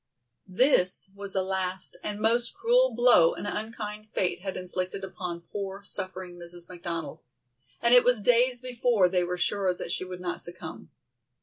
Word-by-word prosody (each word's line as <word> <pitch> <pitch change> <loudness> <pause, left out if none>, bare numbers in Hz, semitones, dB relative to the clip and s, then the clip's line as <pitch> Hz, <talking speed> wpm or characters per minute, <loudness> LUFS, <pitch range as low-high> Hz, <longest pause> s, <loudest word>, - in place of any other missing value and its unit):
This 190 -3 +4
was 200 -1 -3
the 190 - +1
last 190 0 -2
and 205 0 -5
most 235 - +1
cruel - - +2
blow 240 -9 +5
an - - -7
unkind 215 0 -6
fate 180 -4 -2
had 190 0 -5
inflicted 185 +1 -5
upon 180 -2 -6
poor, 195 0 -6
suffering 185 -2 -1
Mrs. 175 0 -3
McDonald, 170 -4 -6 0.6
and 235 +1 +4
it 245 - +7
was 245 -2 +5
days 245 +3 +3
before 240 -6 +1
they 180 0 0
were 180 +1 -4
sure 190 0 0
that - - -7
she - - -2
would 180 -1 -8
not 180 -1 -3
succumb. 175 -2 -4
190 Hz, 165 wpm, -26 LUFS, 180-225 Hz, 0.6 s, it